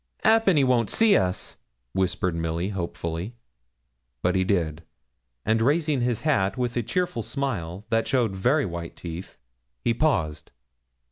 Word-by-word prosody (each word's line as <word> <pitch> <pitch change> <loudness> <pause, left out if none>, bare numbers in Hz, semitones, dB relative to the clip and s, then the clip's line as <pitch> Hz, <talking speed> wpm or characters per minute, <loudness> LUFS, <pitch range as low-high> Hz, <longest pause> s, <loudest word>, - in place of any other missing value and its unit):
''Appen 220 -6 +5
he 140 - +5
won't 125 -4 +2
see 220 -3 +4
us,' 90 0 0 0.4
whispered 95 -1 0
Milly, 85 +2 -2
hopefully. 85 +1 -4 0.9
But 90 - +3
he 95 - +2
did, 85 -5 0 0.6
and 110 +1 +2
raising 150 +1 +2
his 120 -2 0
hat, 105 -9 +1
with 125 -1 -1
a 120 - +1
cheerful 175 - -1
smile, 105 -7 -3
that 115 0 +2
showed 120 -7 +1
very 130 +10 +2
white 85 -2 -6
teeth, 85 +1 -8 0.5
he 120 - +2
paused. 105 - 0
110 Hz, 140 wpm, -25 LUFS, 90-130 Hz, 0.9 s, Appen